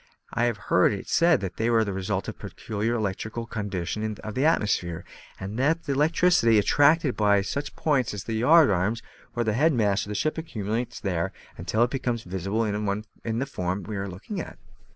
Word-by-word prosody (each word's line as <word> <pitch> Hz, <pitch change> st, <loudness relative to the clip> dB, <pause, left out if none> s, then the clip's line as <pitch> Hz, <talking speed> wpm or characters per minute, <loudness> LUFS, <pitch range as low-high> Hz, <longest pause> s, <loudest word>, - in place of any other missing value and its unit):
I 120 Hz, -, +2 dB
have 120 Hz, -3 st, 0 dB
heard, 95 Hz, -2 st, +3 dB
it 100 Hz, -, -6 dB
said 170 Hz, -6 st, +4 dB
that 95 Hz, -2 st, -5 dB
they 115 Hz, +1 st, +1 dB
are 115 Hz, -1 st, +4 dB
the 100 Hz, -2 st, -3 dB
result 95 Hz, 0 st, -2 dB
of -, -, -3 dB
a -, -, -36 dB
peculiar 110 Hz, +2 st, -2 dB
electrical 110 Hz, +2 st, -3 dB
condition 105 Hz, -1 st, -3 dB
of 110 Hz, -, -5 dB
the 130 Hz, +6 st, +1 dB
atmosphere, 90 Hz, -, +1 dB, 0.3 s
and 100 Hz, +4 st, -5 dB
that 160 Hz, +5 st, +2 dB
the -, -, -3 dB
electricity, 150 Hz, -4 st, +4 dB
attracted 145 Hz, +6 st, +4 dB
by 105 Hz, -1 st, +3 dB
any 100 Hz, -, +2 dB
such 140 Hz, +8 st, -4 dB
points 140 Hz, -6 st, +1 dB
as 105 Hz, -2 st, -5 dB
the 115 Hz, -, -4 dB
yard 145 Hz, +4 st, +5 dB
arms 100 Hz, +5 st, 0 dB, 0.3 s
or 120 Hz, -, +1 dB
mast 110 Hz, -2 st, 0 dB
heads 120 Hz, -9 st, +2 dB
of -, -, -6 dB
a -, -, -3 dB
ship, 155 Hz, +8 st, 0 dB
accumulates 120 Hz, -4 st, -3 dB
there 95 Hz, -2 st, -1 dB, 0.2 s
until 110 Hz, +6 st, 0 dB
it 120 Hz, -, 0 dB
becomes 120 Hz, -4 st, -2 dB
visible 95 Hz, +5 st, -2 dB
in 105 Hz, +2 st, -3 dB
the 135 Hz, -, 0 dB
form 95 Hz, -7 st, -3 dB
we 105 Hz, +3 st, -6 dB
are 100 Hz, 0 st, -3 dB
now 95 Hz, -, -7 dB
looking 180 Hz, -, -6 dB
at." -, -, -9 dB
110 Hz, 205 wpm, -26 LUFS, 100-130 Hz, 0.3 s, yard